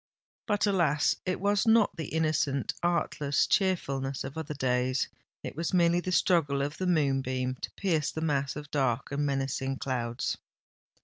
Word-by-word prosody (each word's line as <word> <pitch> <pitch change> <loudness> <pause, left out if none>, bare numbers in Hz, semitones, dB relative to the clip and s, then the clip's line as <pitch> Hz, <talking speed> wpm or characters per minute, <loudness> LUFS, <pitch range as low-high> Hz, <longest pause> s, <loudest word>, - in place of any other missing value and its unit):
But, 205 -1 +2
alas! 170 -8 +2
it 185 - 0
was 205 +3 +1
not 225 -1 +4
the 160 -4 -4
innocent—artless 155 -1 0
cheerfulness 140 -9 0
of 135 +1 -7
other 155 -2 -4
days:—it 130 0 -2
was 165 +3 -1
merely 170 0 +4
the 185 +1 -3
struggle 160 -6 +2
of 145 +2 -4
the 185 - -1
moonbeam 135 -5 +1
to - - -4
pierce 160 -7 0
the 160 - -5
mass 140 -3 0
of 150 0 -8
dark 130 -3 0
and 140 +1 -1
menacing 135 -1 -1
clouds! 120 -3 -2
145 Hz, 145 wpm, -29 LUFS, 135-175 Hz, -, not